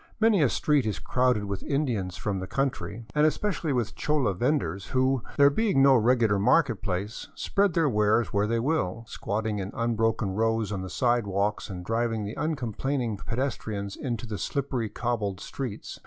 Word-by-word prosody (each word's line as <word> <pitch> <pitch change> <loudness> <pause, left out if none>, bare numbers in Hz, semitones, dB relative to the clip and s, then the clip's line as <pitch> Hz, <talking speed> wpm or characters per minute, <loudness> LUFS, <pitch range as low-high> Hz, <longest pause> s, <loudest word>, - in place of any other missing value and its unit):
Many 220 -5 +4
a 140 - +4
street 145 -4 +2
is 105 - -1
crowded 125 -4 +1
with 100 -1 -4
Indians 115 -11 -1
from 100 -2 -2
the 95 - -5
country, 120 -3 -2
and 150 - +3
especially 165 0 +1
wjth 120 -5 -1
chola 150 -9 +1
vendors 100 - -1
who, 130 0 +1 0.2
there 140 0 +7
being 195 -5 +2
no 135 -1 +7
regular 115 -3 +3
market 120 +2 +3
place, 100 +2 -3
spread 200 -3 +1
their 165 -3 +3
wares 105 -2 +2
where 100 +1 +2
they 115 +1 +1
will, 115 - -1
squatting 105 0 -2
in 95 0 -4
unbroken 115 -3 0
rows 110 +1 0
on 95 -2 -3
the 95 - -6
sidewalks 105 -5 0
and 90 -2 -6
driving 115 0 0
the 105 +2 -4
uncomplaining 130 -4 -2
pedes 120 +7 -2
trian 100 -2 -5
into 120 -4 -4
the 105 -4 -5
slippery 130 -1 -2
cobbled 105 -6 -2
streets. 125 -4 -6
115 Hz, 170 wpm, -27 LUFS, 105-135 Hz, 0.2 s, there